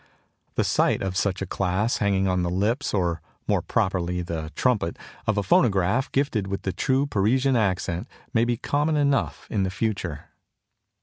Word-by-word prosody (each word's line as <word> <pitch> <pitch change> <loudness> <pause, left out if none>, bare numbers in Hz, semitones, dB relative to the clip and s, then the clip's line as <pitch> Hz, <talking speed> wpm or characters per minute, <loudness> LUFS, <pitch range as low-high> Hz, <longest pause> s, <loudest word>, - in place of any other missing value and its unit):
The - - +2
sight - - +2
of 95 -1 -2
such 95 0 0
a - - -3
class 100 +5 0
hanging 95 -2 +1
on 90 -1 +1
the 90 - 0
lips 105 +10 0
or 85 -4 0 0.3
more - - +2
properly 90 -1 0
the 80 -2 -4
trumpet 110 -10 +1 0.3
of 110 -1 +1
a 105 - +2
phonograph 100 +4 +2
gifted 130 -8 0
with 100 0 -4
the 95 - -2
true 135 +7 +1
Parisian 130 +3 +2
accent 95 -5 0 0.3
may 115 - +4
be 120 0 0
common 150 +5 0
enough 140 -2 +1
in 105 - +1
the 95 - +1
future. 95 -6 -3
100 Hz, 170 wpm, -25 LUFS, 90-120 Hz, 0.3 s, may